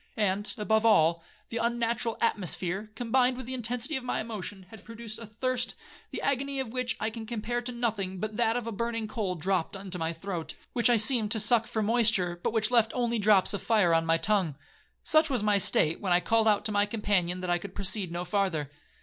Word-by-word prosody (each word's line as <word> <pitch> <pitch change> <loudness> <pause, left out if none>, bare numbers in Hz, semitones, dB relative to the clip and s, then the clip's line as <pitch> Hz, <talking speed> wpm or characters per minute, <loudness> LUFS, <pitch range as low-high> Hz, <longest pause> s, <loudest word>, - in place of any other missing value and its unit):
And, 205 0 0
above 220 +1 +1
all, 170 -6 +4 0.3
the 230 - -4
unnatural 235 0 -1
atmosphere, 195 -2 -1
combined 250 +2 +1
with 260 - -6
the 260 - -6
intensity 245 +4 -3
of 260 - -7
my 250 - -2
emotion, 205 -3 -6
had 220 - -12
produced 230 -1 -8
a 230 - -9
thirst, 245 +3 -2 0.3
the - - -6
agony 275 0 -1
of 260 -3 -3
which 255 0 -1
I 220 - -1
can 225 -1 -8
compare 240 +1 -3
to 250 +1 -3
nothing 215 -6 -2
but 215 +1 -4
that 230 0 +1
of 245 - -4
a 230 - -4
burning 230 +1 -3
coal 210 -4 -3
dropt 180 +2 -1
into 190 -2 -6
my 165 0 -1
throat, 170 0 -5 0.2
which 240 0 +5
I 240 - +5
seemed 220 -1 +4
to 220 - -1
suck 225 +1 +4
for 220 - -2
moisture, 210 -6 +2
but - - -1
which 220 0 0
left 230 -2 +3
only 235 -2 0
drops 205 -2 +4
of 200 - -3
fire 210 -7 +3
on 165 0 +2
my 165 0 +3
tongue. 190 -6 0 0.5
Such 310 0 +4
was 250 -6 0
my 210 -1 +3
state, 160 -3 +2
when 190 -3 -2
I 175 - +5
called 225 +4 +2
out 210 -2 +2
to 215 - +1
my 205 0 +2
companion 195 -5 -1
that 180 -1 -2
I 175 - +2
could 190 +1 -9
proceed 195 -2 +1
no 175 +1 -4
farther. 175 -7 -1
215 Hz, 220 wpm, -28 LUFS, 190-235 Hz, 0.5 s, which